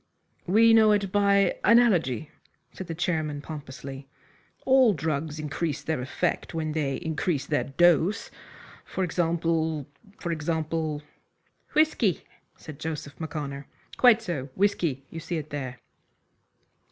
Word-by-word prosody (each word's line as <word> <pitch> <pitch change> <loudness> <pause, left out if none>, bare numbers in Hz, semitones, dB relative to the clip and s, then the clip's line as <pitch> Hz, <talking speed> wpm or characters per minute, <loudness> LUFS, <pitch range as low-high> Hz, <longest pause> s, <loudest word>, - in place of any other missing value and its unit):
"We 225 +5 +6
know 220 -1 +6
it 200 -2 0
by 200 -1 +3
analogy," 180 - +3 0.4
said 190 - -7
the 165 - -4
chairman, 155 -4 -1
pompously. 140 -2 -8 0.6
"All 260 -5 +5
drugs 155 0 -2
increase 155 0 -3
their 160 -5 -2
effect 165 +6 -2
when 155 -1 -2
they 145 -3 -1
increase 160 -3 -2
their 145 0 0
dose; 175 +7 +2 0.5
for 190 - -3
example 165 -3 0 0.3
for 170 - -3
example 160 -1 -2 0.3
" - - -37
"Whisky," 300 - +2 0.3
said 155 -3 -11
Joseph 150 -3 -5
M'Connor. 145 -3 -5 0.3
"Quite 235 -3 +5
so. 150 -9 -4
Whisky. 170 -9 0
You 165 - -6
see 170 +1 -4
it 155 -1 -6
there." 130 -3 -5
160 Hz, 125 wpm, -26 LUFS, 145-185 Hz, 0.6 s, We